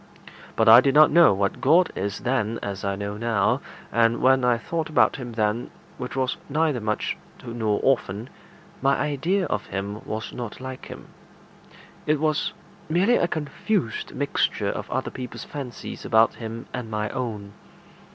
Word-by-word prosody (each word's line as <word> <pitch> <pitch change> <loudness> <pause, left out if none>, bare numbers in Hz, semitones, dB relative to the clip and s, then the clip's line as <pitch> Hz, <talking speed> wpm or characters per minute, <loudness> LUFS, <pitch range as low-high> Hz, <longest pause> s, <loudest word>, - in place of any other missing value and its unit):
But 110 - +2
I 115 +2 +10
did 135 0 +1
not 155 +1 +7
know 170 -3 +7
what 100 0 -1
God 165 +6 +4
is 100 +1 -3
then 115 -3 0
as 100 -1 -4
I 100 0 -1
know 100 +1 -4
now, 110 -3 +1 0.3
and 115 +1 +3
when 130 0 +4
I 125 -1 +3
thought 165 +7 -3
about 155 - +3
him 125 -3 -7
then, 110 +1 0 0.3
which 125 - -5
was 130 +3 0
neither 150 -3 +1
much 105 0 -1 0.3
nor 110 -3 -1
often, 115 -4 0 0.5
my 135 0 +3
idea 155 +7 0
of 105 -9 -3
him 100 +2 -4
was 110 +1 -5
not 120 -4 -6
like 130 0 -7
him; - - -10 1.0
it 155 -1 +2
was 155 +4 +1 0.4
merely 190 +9 +3
a - - +2
confused 155 - -2
mixture 140 +1 0
of - - -4
other - - -2
people's 125 -2 -7
fancies 135 -6 -7
about 110 0 +4
him 115 0 -7
and 125 -3 -5
my 105 -1 -2
own. 110 -6 -4
120 Hz, 160 wpm, -24 LUFS, 110-145 Hz, 1.0 s, I